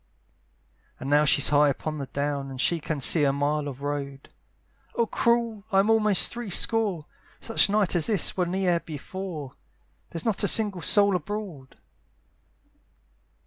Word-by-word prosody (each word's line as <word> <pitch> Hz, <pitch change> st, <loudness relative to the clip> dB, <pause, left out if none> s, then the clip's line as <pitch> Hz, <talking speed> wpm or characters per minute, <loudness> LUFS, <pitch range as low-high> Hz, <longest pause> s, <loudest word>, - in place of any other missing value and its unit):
And 135 Hz, +2 st, -6 dB
now 150 Hz, +1 st, +4 dB
she's 145 Hz, -1 st, +4 dB
high 145 Hz, 0 st, +3 dB
upon 155 Hz, +2 st, -5 dB
the 140 Hz, -, -6 dB
down, 140 Hz, 0 st, -4 dB
And 130 Hz, -1 st, -9 dB
she 165 Hz, +5 st, +1 dB
can 155 Hz, -1 st, -5 dB
see 155 Hz, +3 st, +4 dB
a 140 Hz, -, +2 dB
mile 145 Hz, +1 st, -2 dB
of 140 Hz, 0 st, -9 dB
road, 140 Hz, -1 st, -6 dB, 0.6 s
"Oh 235 Hz, -, +1 dB
cruel! 235 Hz, -2 st, -1 dB
I'm 195 Hz, +2 st, +2 dB
almost 215 Hz, -3 st, +4 dB
three 240 Hz, -3 st, -7 dB
score; 200 Hz, -3 st, 0 dB, 0.4 s
"Such 225 Hz, -2 st, +2 dB
night 205 Hz, -3 st, 0 dB
as 170 Hz, -, +2 dB
this 205 Hz, -7 st, +1 dB
was 180 Hz, -2 st, -1 dB
ne'er 180 Hz, -1 st, 0 dB
before, 160 Hz, -1 st, -8 dB, 0.6 s
"There's 165 Hz, -, -5 dB
not 220 Hz, -3 st, 0 dB
a -, -, +3 dB
single 205 Hz, -5 st, +3 dB
soul 200 Hz, +6 st, +3 dB
abroad." 180 Hz, -6 st, -7 dB
170 Hz, 150 wpm, -25 LUFS, 145-205 Hz, 0.6 s, now